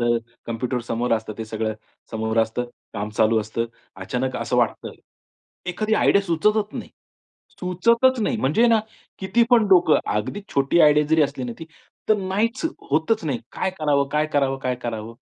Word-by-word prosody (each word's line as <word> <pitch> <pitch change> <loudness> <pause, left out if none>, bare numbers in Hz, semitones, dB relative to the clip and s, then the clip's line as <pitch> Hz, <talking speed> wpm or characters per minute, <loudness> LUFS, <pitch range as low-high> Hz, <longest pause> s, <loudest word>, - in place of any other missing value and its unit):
तर 120 0 +2 0.3
कॉम्प्युटर 120 +2 -2
समोर 120 +1 -1
असतं. 110 -1 -1
ते 110 - -3
सगळं 110 0 -3 0.4
समोर 110 0 -1
असतं, 115 +2 +1 0.3
काम 105 +1 -3
चालू 110 0 +4
असतं. 115 +2 -3 0.3
अचानक 125 +7 -3
असं - - -2
वाटतं. - - 0 0.7
एखादी 215 +5 0
आयडिया 200 -1 +4
सुचतच 210 +5 +1
नाही, - - -6 0.7
सुचतच 230 +8 +2
नाही. - - 0
म्हणजे 155 - +2
ना 225 -2 +4 0.4
किती 215 +5 +2
पण 230 -4 +5
डोकं 175 -4 +5 0.2
अगदी 110 - -3
छोटी 140 +5 +3
आयडिया 150 0 +5
जरी 160 0 +4
असली 135 -2 -2
ना, 120 - -4
ती 160 - -7 0.4
तर 215 - +5
नाहीच 210 - -1 0.3
होतच 160 +7 +1
नाही. 135 -6 -1
काय 190 - -1
करावं, 145 -3 +1
काय 150 +1 +2
करावं, 135 -1 +1
काय 130 -1 -1
करावं? 115 -1 -5
145 Hz, 165 wpm, -23 LUFS, 115-195 Hz, 0.7 s, पण